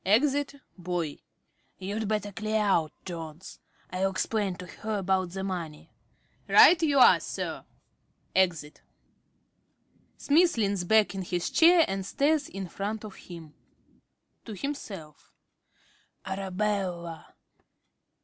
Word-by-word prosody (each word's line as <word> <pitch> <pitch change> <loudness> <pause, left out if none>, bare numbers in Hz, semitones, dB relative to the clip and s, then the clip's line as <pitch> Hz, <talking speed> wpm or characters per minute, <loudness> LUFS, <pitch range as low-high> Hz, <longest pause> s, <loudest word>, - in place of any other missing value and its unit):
(Exit 280 +7 +2 0.2
Boy.) 175 -4 -3 0.6
You'd 205 +3 -4
better 210 -1 -2
clear 215 +2 -1
out, 180 -7 +2
Jones. 165 0 -8 0.3
I'll 185 +2 0
explain 195 0 -1
to 180 - -9
her 215 +4 -5
about 190 -1 0
the 190 +2 -5
money. 170 -6 -5 0.5
~Smith.~ - - 0
Right 340 -1 +8
you 295 -4 +2
are, 255 - +7
Sir. - - -5 0.7
(Exit.) 170 -6 0 1.4
(Smith 335 +1 +3
leans 200 -4 0
back 215 +2 +3
in 195 - -4
his 175 -1 -3
chair 335 0 +6
and 195 0 -3
stares 285 +7 0
in 195 -1 -6
front 205 +5 -5
of 210 - -9
him.) 165 -5 -12
~Smith~ - - -37 0.4
(to 220 - -7
himself). 195 - -7 0.9
Arabella! 190 -3 -3
195 Hz, 120 wpm, -28 LUFS, 180-220 Hz, 1.4 s, Right